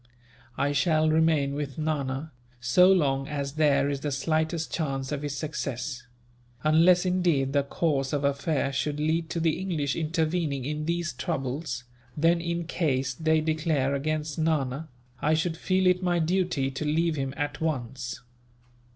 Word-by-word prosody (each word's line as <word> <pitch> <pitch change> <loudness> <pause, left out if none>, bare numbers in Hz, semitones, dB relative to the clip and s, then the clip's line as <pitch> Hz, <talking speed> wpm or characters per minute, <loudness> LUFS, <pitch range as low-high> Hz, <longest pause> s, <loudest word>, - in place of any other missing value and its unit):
"I 145 - +1
shall 155 +1 +2
remain 155 -3 +3
with 140 -2 -4
Nana, 150 -1 -2 0.3
so 150 +10 +5
long 135 -7 +2
as 140 -2 -3
there 145 -3 +3
is 140 -1 -1
the 145 +1 -3
slightest 160 +4 -1
chance 135 -4 -2
of 145 -1 -2
his 145 -1 -3
success; 130 -3 -4 0.6
unless, 170 +4 +5
indeed, 170 -7 +1
the 140 - +4
course 140 -1 -1
of 145 -1 -1
affairs 140 0 0
should 145 +1 -1
lead 160 +2 0
to 170 - -2
the 165 -1 +1
English 160 -8 -1
intervening 160 -4 -1
in 150 +1 -3
these 170 -2 -1
troubles; 130 +1 -3 0.3
then, 165 +2 +3
in 170 0 -2
case 135 -6 0
they 160 +3 +2
declare 155 -3 0
against 155 +2 -2
Nana, 155 -2 0 0.3
I 155 +1 +3
should 160 +1 0
feel 185 +2 +1
it 180 0 +4
my 175 -1 +1
duty 170 -5 0
to 135 +3 -4
leave 160 +2 +1
him 135 -2 -2
at 145 0 -3
once." 130 -5 -3
155 Hz, 155 wpm, -27 LUFS, 140-165 Hz, 0.6 s, so